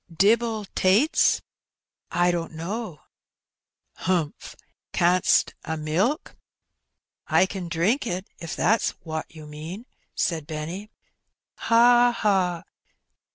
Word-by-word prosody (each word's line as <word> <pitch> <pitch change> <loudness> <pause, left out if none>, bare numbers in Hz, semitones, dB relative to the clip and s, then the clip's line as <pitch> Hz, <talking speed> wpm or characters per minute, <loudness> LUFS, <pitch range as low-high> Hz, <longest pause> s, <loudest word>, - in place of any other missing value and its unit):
"Dibbel 220 +4 +2
tates?" 210 - +3 0.3
" - - -67 0.3
I 175 0 +3
don't 170 -1 -3
know." 175 - -5 1.0
''Humph. 165 -5 -2 0.4
Canst 180 +1 +3
a 160 - -3
milk?" 185 - -1 0.5
'' - - -59
I - - +4
ken 190 -2 -6
drink 195 - +1
it, 185 0 -3
if 165 - -6
that's 225 +1 +1
wot 160 -1 -4
you 155 -1 -12
mean," 160 +9 -8 0.3
said 160 -4 -1
Benny. 165 +7 -6 0.4
" - - -58
Ha! 240 +1 +6
ha 185 -5 +1
180 Hz, 110 wpm, -25 LUFS, 165-220 Hz, 1.0 s, Ha